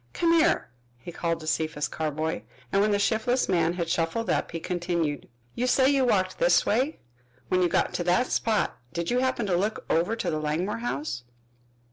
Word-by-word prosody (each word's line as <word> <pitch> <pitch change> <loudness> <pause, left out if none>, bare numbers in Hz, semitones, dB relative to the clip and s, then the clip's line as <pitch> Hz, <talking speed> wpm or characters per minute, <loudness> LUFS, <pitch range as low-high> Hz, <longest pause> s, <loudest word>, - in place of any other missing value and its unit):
"Come 335 -1 +2
here," 330 - +2 0.3
he 150 +8 -9
called 165 -1 -2
to - - -8
Cephas 155 -1 -1
Carboy, 155 -4 -2 0.3
and 195 - +3
when 210 - +3
the 205 - +2
shiftless 230 +5 +1
man 170 -3 +2
had 170 -2 -2
shuffled 165 +8 0
up, - - 0
he 165 - -5
continued: 170 -4 -2 0.2
"You 250 - -1
say 260 +2 +4
you 270 -2 +3
walked 190 -6 +1
this - - +4
way. 260 +8 +1 0.5
When 185 - +2
you 175 - +3
got - - +1
to 175 - -1
this 180 +8 +1
spot 220 -2 0
did 170 +3 -2
you 245 - +2
happen 260 -3 0
to 185 -3 +1
look 205 +5 -1
over 175 +7 +2
to 185 -6 -2
the 155 - -1
Langmore 165 +8 -1
house?" 150 - -3
180 Hz, 195 wpm, -26 LUFS, 165-230 Hz, 0.5 s, say